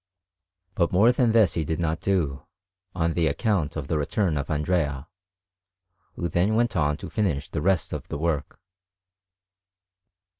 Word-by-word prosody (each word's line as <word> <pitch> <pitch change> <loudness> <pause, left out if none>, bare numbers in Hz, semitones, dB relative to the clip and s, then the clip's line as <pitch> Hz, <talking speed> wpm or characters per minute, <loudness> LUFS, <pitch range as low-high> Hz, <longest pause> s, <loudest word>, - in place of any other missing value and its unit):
But 85 -2 +1
more 105 +6 +5
than 120 -2 +2
this 110 -5 +4
he 80 - 0
did 80 +2 -3
not 80 -1 -1
do, 75 -8 -1 0.5
on 85 -2 0
account 80 - 0
of 75 -4 -4
the 80 -1 0
return 85 +3 0
of 70 0 -3
Andrea, 75 -2 -1 1.1
who 85 - -2
then 90 +6 +1
went 120 -1 +1
on 75 -3 +1
to - - -8
finish 85 -10 -1
the 80 - -3
rest 95 +1 +1
of - - -5
the - - -4
work. 75 -2 -2
80 Hz, 150 wpm, -25 LUFS, 75-95 Hz, 1.1 s, more